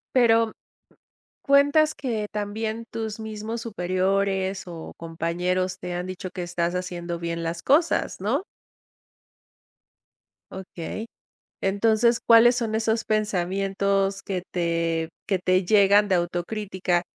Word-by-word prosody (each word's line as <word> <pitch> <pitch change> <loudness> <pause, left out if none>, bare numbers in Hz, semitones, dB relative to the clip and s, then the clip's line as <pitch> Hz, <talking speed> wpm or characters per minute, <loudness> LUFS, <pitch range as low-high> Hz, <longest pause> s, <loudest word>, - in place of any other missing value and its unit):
Pero, 230 -2 +4 0.9
cuentas 285 +2 +4
que 225 -6 -3
también 215 +2 -3
tus 220 -1 -4
mismos 220 +1 -5
superiores 190 -1 0
o 165 -2 -8
compañeros 175 +3 -2
te 180 - -5
han 175 +1 -3
dicho 185 0 -6
que 185 - -5
estás 175 0 -1
haciendo 175 -1 -4
bien 170 0 -3
las 165 0 -3
cosas, 315 +5 +2
¿no? - - 0 2.1
Okey. 190 +3 -6 0.5
Entonces, 220 +4 +3
¿cuáles 235 +1 +6
son 225 -2 -1
esos 220 0 0
pensamientos 195 -1 0
que 185 -3 -3
te 165 -2 0 0.2
que 195 -2 +1
te 185 +1 +2
llegan 205 +1 +5
de 185 - +3
autocrítica? 180 +1 -1
195 Hz, 110 wpm, -25 LUFS, 175-220 Hz, 2.1 s, cuáles